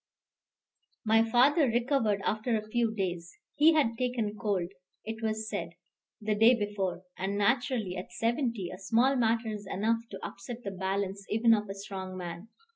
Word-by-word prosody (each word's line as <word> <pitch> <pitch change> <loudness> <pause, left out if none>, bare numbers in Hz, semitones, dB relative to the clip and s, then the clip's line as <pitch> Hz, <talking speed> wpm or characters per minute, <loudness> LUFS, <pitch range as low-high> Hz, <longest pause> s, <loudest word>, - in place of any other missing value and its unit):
My 225 +1 +5
father 275 +6 +5
recovered 235 -4 +1
after 220 +2 0
a 215 0 -6
few 230 0 +1
days: 180 -5 -4 0.2
he 315 +3 +5
had 230 -8 +2
taken 240 -4 -1
cold, 195 -5 -1 0.3
it 220 +1 -5
was 220 0 -2
said, 170 -6 -4 0.5
the 215 0 0
day 225 +4 +6
before; 205 -4 -2 0.2
and 195 +2 -1
naturally, 225 -2 +1
at 180 -1 -7
seventy, 230 -2 -1
a 185 - -9
small 235 +7 +3
matter 230 -2 +1
is 205 -1 -7
enough 225 +3 +1
to 195 - -7
upset 235 +4 -8
the 200 - -4
balance 195 +1 -2
even 225 +2 +4
of 210 -2 0
a 195 - -4
strong 190 -2 -6
man. 175 +2 -6
215 Hz, 165 wpm, -30 LUFS, 195-235 Hz, 0.5 s, day